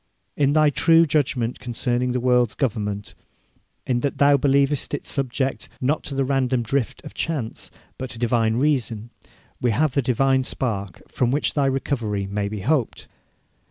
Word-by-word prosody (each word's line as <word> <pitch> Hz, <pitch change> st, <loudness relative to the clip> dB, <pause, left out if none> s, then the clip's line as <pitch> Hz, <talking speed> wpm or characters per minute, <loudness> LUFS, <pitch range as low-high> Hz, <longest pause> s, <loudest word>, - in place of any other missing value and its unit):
In 140 Hz, 0 st, +2 dB
thy 155 Hz, -1 st, +4 dB
true 165 Hz, +3 st, +5 dB
judgment 130 Hz, -6 st, 0 dB
concerning 125 Hz, 0 st, -1 dB
the 125 Hz, -, 0 dB
world's 125 Hz, -2 st, +2 dB
government, 105 Hz, -5 st, -2 dB, 0.7 s
in 125 Hz, -2 st, +1 dB
that 140 Hz, +2 st, -2 dB
thou 140 Hz, 0 st, +5 dB
believest 140 Hz, +1 st, +1 dB
it -, -, -7 dB
subject, 130 Hz, -3 st, -2 dB
not 145 Hz, +4 st, 0 dB
to 140 Hz, -, -5 dB
the 135 Hz, 0 st, +1 dB
random 130 Hz, -2 st, +1 dB
drift 125 Hz, +1 st, -2 dB
of -, -, -9 dB
chance, 145 Hz, -9 st, -4 dB, 0.3 s
but 130 Hz, -, -4 dB
to 115 Hz, -, -8 dB
divine 115 Hz, -1 st, +1 dB
reason, 120 Hz, -5 st, 0 dB, 0.5 s
we 125 Hz, -, +2 dB
have 140 Hz, +5 st, +1 dB
the 140 Hz, -, +2 dB
divine 130 Hz, +1 st, +2 dB
spark 100 Hz, -8 st, -3 dB
from 125 Hz, -, 0 dB
which 145 Hz, +4 st, 0 dB
thy 140 Hz, -2 st, +2 dB
recovery 120 Hz, -7 st, -1 dB
may 100 Hz, +1 st, -2 dB
be 105 Hz, -1 st, -5 dB
hoped. 130 Hz, +2 st, -1 dB
125 Hz, 160 wpm, -23 LUFS, 115-140 Hz, 0.7 s, true